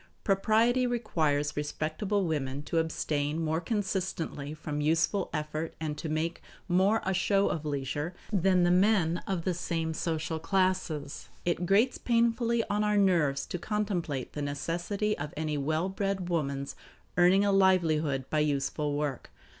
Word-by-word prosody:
Propriety 225 +5 +3
requires 155 -12 0
respectable 155 +7 -1
women 145 -3 -2
to 165 - 0
abstain 155 -1 -1
more 160 0 0
consistently 185 -7 -2
from 150 -1 -4
useful 165 +6 +1
effort 155 +1 -3
and 155 -2 -3
to 160 - -4
make 160 +2 -2 0.3
more 190 +5 +3
of - - -8
a 190 - +2
show 195 +2 +2
of 155 -2 -3
leisure 145 +4 -3 0.2
than 185 -1 +3
the 175 - +4
men 180 -3 +3
of 185 -4 -1
the 185 - 0
same 165 -2 -2
social 160 0 -2
classes. 180 -5 -1 0.2
It 175 0 0
grates 220 +7 +3
painfully 235 0 +2
on 210 +1 0
our 210 0 +2
nerves 170 -8 +2
to 180 - -5
contemplate 180 - -2
the 150 - -4
necessity 175 +9 -2
of 145 +1 -5
any 155 -1 -1
well 155 +5 0
bred 195 -1 -2
woman's 140 -5 -2 0.4
earning 180 +3 +5
a 200 - +3
livelihood 160 -8 +3
by 155 - +2
useful 145 0 0
work. 145 -3 -3
170 Hz, 150 wpm, -29 LUFS, 150-195 Hz, 0.4 s, earning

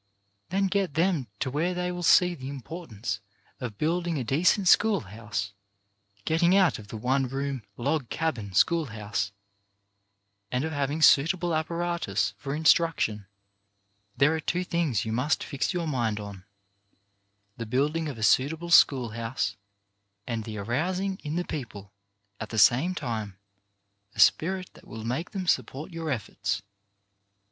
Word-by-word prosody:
Then 195 +3 +1
get 190 -5 0
them 165 -6 +1
to 130 - -1
where 170 +6 0
they 180 0 -1
will 175 0 -5
see 180 +1 +5
the 135 -5 -7
impor 160 +5 -8
tance 105 -1 -4 0.4
of 115 -5 -6
building 170 +1 0
a 130 - -1
decent 170 - +2
school 205 -1 +5
house 105 0 -5 0.3
— 100 0 -38
getting 170 +3 +3
out 190 - +4
of 105 - -11
the 110 - -7
one 130 +4 +1
room 135 0 -3 0.2
log 140 +1 -1
cabin 125 -12 -2
school 165 - +3
house— 105 -2 -3 1.2
and 125 +2 0
of 160 - -2
having 145 +1 -1
suitable 170 +5 +4
apparatus 160 - -1
for 135 +8 -4
instruction. 150 -10 +2 0.9
There 145 +3 +4
are - - -2
two 175 +3 -1
things 170 - 0
you 110 - -3
must 125 +7 0
fix 140 -3 -2
your 175 -3 -2
mind 120 -8 -1
on 100 -1 -7
• 90 - -17 1.1
the 115 -2 -5
building 150 +7 0
of 135 - -7
a 110 - -5
suitable 160 +9 +2
school 130 -7 +6
house 115 -2 -3 0.7
and 115 -2 -3
the 110 -1 -6
arousing 180 - -1
in 150 0 -3
the 175 +1 -1
people, 105 -9 -7 0.5
at 110 - -5
the 110 - -5
same 135 - +5
time, 110 - -4 0.8
a - - -11
spirit 185 +2 +3
that - - -17
will 110 0 -8
make 130 +9 -2
them 195 -3 -4
support 140 +1 -1
your 165 -1 -4
efforts. 100 -6 -2
140 Hz, 155 wpm, -27 LUFS, 110-170 Hz, 1.2 s, school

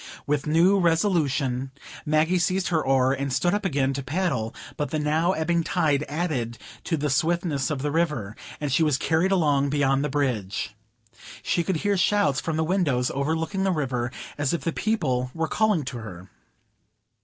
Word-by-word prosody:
With 145 0 -1
new 175 +6 +4
resolution, 155 -7 +1 0.4
Maggie 155 +4 +2
seized 185 +2 0
her 160 -3 +1
oar, 135 -1 +3
and 140 0 -3
stood 175 +7 +1
up 205 +1 0
again 135 -6 +1
to 135 - -3
paddle; 135 -7 -2 0.2
but 150 -2 -2
the 155 - -1
now 155 +4 +1
ebbing 170 +1 0
tide 155 -4 +1
added 140 -7 -2 0.3
to 165 - 0
the 150 0 -1
swiftness 155 -1 0
of 140 -3 -3
the 145 - 0
river, 150 -11 -1 0.2
and 145 -2 -2
she 140 - +2
was 150 -4 +3
carried 165 +6 +1
along 145 -6 +2
beyond 140 -1 +2
the 150 - -1
bridge. 115 -8 -2 0.7
She 170 - +1
could 190 +1 -1
hear 200 -1 +2
shouts 180 -8 +2
from 160 -2 -2
the 160 - +1
windows 155 -8 +1
overlooking 160 +7 -1
the 195 - +2
river, 130 -6 -1 0.3
as 145 +2 +1
if - - -4
the 165 - -2
people 150 - 0
there 165 - -6
were 160 - +2
calling 210 -6 +1
to 130 -2 -5
her. 95 -4 -9
150 Hz, 180 wpm, -25 LUFS, 135-170 Hz, 0.7 s, new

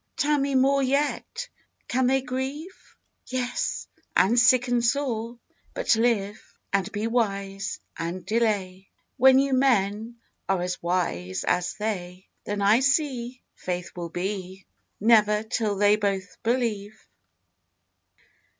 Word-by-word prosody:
Tell 295 -2 +2
me 275 0 0
more 275 +1 +4
yet, 285 - -1 0.4
can 255 0 +1
they 265 0 +2
grieve? 270 +8 -6 0.3
Yes, 250 -1 -2 0.3
and 235 +6 +4
sicken 245 -1 +4
sore, 235 -2 -1 0.4
but - - +2
live: 215 -3 -1 0.2
And 195 +1 0
be 210 +1 -3
wise 200 -4 -2 0.2
and 170 +2 -5
delay, 195 -3 -1 0.3
When 265 0 +7
you 275 0 +2
men 230 -3 +1 0.3
are 190 -2 +1
as 180 0 -3
wise 95 - -1
as 180 +2 0
they. 190 -4 -4 0.2
Then 205 0 -2
I 210 +4 +5
see 265 -3 0
Faith 180 -1 -5
will 170 -1 -5
be 190 +1 -5 0.3
Never 210 -1 +4
till 220 -2 -1
they 205 +1 +4
both 200 -2 -2
believe. 220 -3 -2
220 Hz, 120 wpm, -25 LUFS, 195-255 Hz, 0.4 s, When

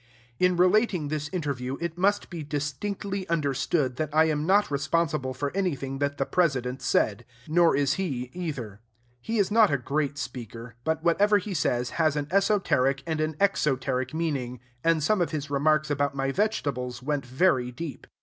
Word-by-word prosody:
In 180 -1 +3
relating 180 -3 +3
this 155 0 -3
interview, 140 -7 -3
it 170 -1 -3
must 200 +3 +1
be 170 -2 -5
distinctly 185 +7 -3
understood 140 -3 0
that 155 -2 -1
I 160 - +6
am 155 0 -1
not 200 -2 +3
responsible 140 -2 0
for 145 +5 -3
anything 140 -8 -2
that 145 0 -1
the - - 0
President 135 -7 0
said; 105 -6 +1 0.2
nor 170 +1 +4
is 140 -1 +2
he, 125 -8 -3
either. 135 - -5 0.4
He 225 - -2
is 200 -1 +2
not 220 -2 +5
a 140 - +2
great 140 +2 -2
speaker; 120 -3 -7
but 160 +2 -1
whatever 205 +5 +4
he 200 0 -4
says 125 -7 0
has 155 -2 +3
an 145 -1 -2
esoteric 190 -9 +2
and 160 -2 -1
an 155 0 -1
exoteric 135 -9 +1
meaning; 140 -7 -2 0.2
and 165 -2 +2
some 210 +4 +2
of 175 - +1
his 150 -2 -4
remarks 155 +1 +2
about 140 -1 0
my 135 0 0
vegetables 135 - -2
went 145 0 -1
very 130 -1 +2
deep. 140 +1 -7
150 Hz, 170 wpm, -27 LUFS, 135-175 Hz, 0.4 s, I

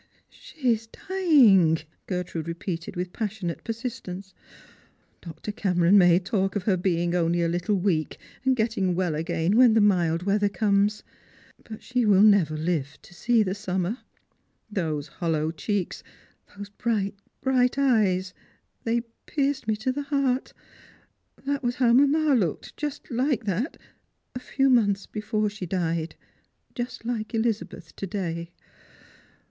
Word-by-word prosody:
" - - -46
She 310 - -4
is 225 0 -5
dying!" 245 - +4 0.3
Gertrude 180 -3 -3
repeated 170 0 -5
with 180 0 -4
passionate 205 -6 -4
persist 235 +1 -5
ence. 190 +2 -7 0.5
" - - -36
Dr. 170 +5 -7
Cameron 180 -3 +2
may 175 -3 +6
talk 195 +1 -1
of 205 - -1
her 195 -2 +2
being 175 -1 0
only 170 0 +1
a - - +2
little 175 +4 0
weak, 180 -5 0 0.3
and 260 0 +3
getting 220 -6 0
well 180 -3 0
again 165 +4 0
when 245 -3 +6
the - - +5
mild 175 -5 +2
weather 205 +1 +2
comes, 205 0 +1 0.6
but 220 -1 -10
she 250 -1 0
will 205 -2 +5
never 190 -8 +4
live 155 -3 -2
to - - -16
see 230 +4 +2
the 185 -2 -2
summer. 190 +2 -2 0.7
Those 155 -7 -2
hollow 160 -2 -1
checks, 185 +3 -3 0.6
those 205 0 -7
bright, 205 -1 -1 0.3
bi'ight 255 -1 +2
eyes, 200 -9 +2 0.5
they 235 +1 +1 0.3
pierced 280 -4 -1
me 215 - +2
to 220 +5 -1
the 285 +3 -3
heart. 275 -3 0 0.9
That 280 0 -1
was 245 -1 -1
how 240 -3 +3
mamma 285 +3 +4
looked, 190 - -1
just 295 -2 -5
like 255 0 0
that, 210 - -2 0.6
a 250 - -5
few 270 +2 0
months 200 -5 +3
before 215 0 -2
she 205 -3 -6
died. 165 -2 -2 0.6
Just 245 -1 -5
like 230 -1 -3
Elizabeth, 220 -7 -2
to 195 - -4
day. 170 -4 -4
200 Hz, 145 wpm, -26 LUFS, 175-240 Hz, 0.9 s, may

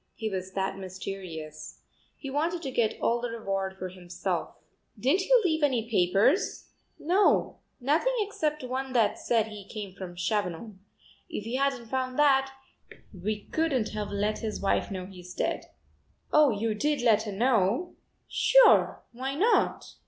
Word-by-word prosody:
He 220 -2 -3
was 190 0 -4
that 195 0 -2
mysterious. 185 -5 -7 0.4
He 275 - -7
wanted 330 +4 -1
to 270 - -3
get 235 -3 0
all 235 +1 +1
the 245 - -2
reward 195 -4 -3
for 185 -1 -5
himself." 180 -1 -4 0.4
"Didn't 300 +10 +3
he - - +4
leave 320 -4 +1
any 250 -6 +1
papers?" 200 - +2 0.3
"No, 370 +6 +2 0.2
nothing 310 - +1
except 305 -8 -2
one 260 +1 -3
that 225 -4 +2
said 225 -2 +1
he 210 -2 -9
came 200 -1 -7
from 185 -2 -8
Chavanon. 190 +1 -2 0.5
If 220 -11 -5
we 230 - -5
hadn't 265 -2 0
found 255 +2 -2
that, 270 -2 +4 0.6
we 205 +3 -3
couldn't 280 -9 +1
have 210 -1 -4
let 205 +1 -1
his 220 -2 -4
wife 195 - +1
know 185 -2 -5
he's 180 -1 -11
dead." - - -1 0.7
"Oh, 300 -1 +6
you 220 0 0
did 290 +5 0
let 220 -3 +5
her - - -3
know?" 230 - +1 0.3
"Sure, - - +5
why 265 +3 -4
not?" 425 +10 +1
225 Hz, 150 wpm, -28 LUFS, 195-275 Hz, 0.7 s, Oh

